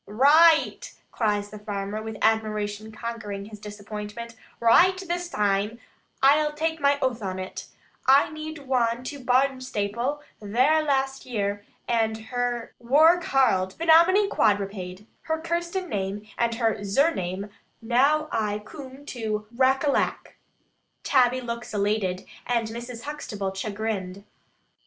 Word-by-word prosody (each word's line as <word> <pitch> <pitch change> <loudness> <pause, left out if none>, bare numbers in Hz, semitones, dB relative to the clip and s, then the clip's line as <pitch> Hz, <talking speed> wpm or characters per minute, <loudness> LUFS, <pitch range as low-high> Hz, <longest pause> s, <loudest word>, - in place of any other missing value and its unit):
"Raight," 315 - +4 0.2
cries 205 -2 -1
the 210 - -9
farmer, 205 0 -4
with 220 0 -6
admiration 215 -1 0
conquering 215 -3 -6
his 210 0 -11
disappointment; 210 +2 -7 0.3
"raight 370 +11 +5
this 350 0 -2
taime, 205 - 0 0.5
ai'll 300 +2 +5
tak 320 +1 -2
my 280 0 +3
oath 250 -3 0
on 190 -2 -3
it. 185 0 -6 0.4
I 275 +3 +5
zeed 310 -1 -7
wan 240 -2 +1
to 280 +2 -6
Barnstaple 255 0 0 0.2
vair 255 +10 +3
last 270 -3 -1
year, 205 -4 -2 0.2
and 225 -2 +1 0.2
her 245 -1 -2
wor 310 +8 +5
karled, 220 - +1
'Phanominy 340 +5 +5
Quadripade,' 200 - -1 0.2
her 320 - +1
Kirsten 340 +3 -2
name 205 - -3
and 235 -1 0
her 225 -2 +1
zurname, 200 - 0 0.3
now 275 +7 +2
ai 210 -2 0
coom 270 +1 -11
to 215 -5 -3
racollack." 270 +3 +1 0.7
Tabby 255 -1 +3
looks 235 -2 -6
elated, 200 -2 0 0.2
and 235 -2 0
Mrs. 235 +1 -7
Huxtable 210 -10 -5
chagrined. 200 -2 -4
235 Hz, 120 wpm, -25 LUFS, 205-280 Hz, 0.7 s, raight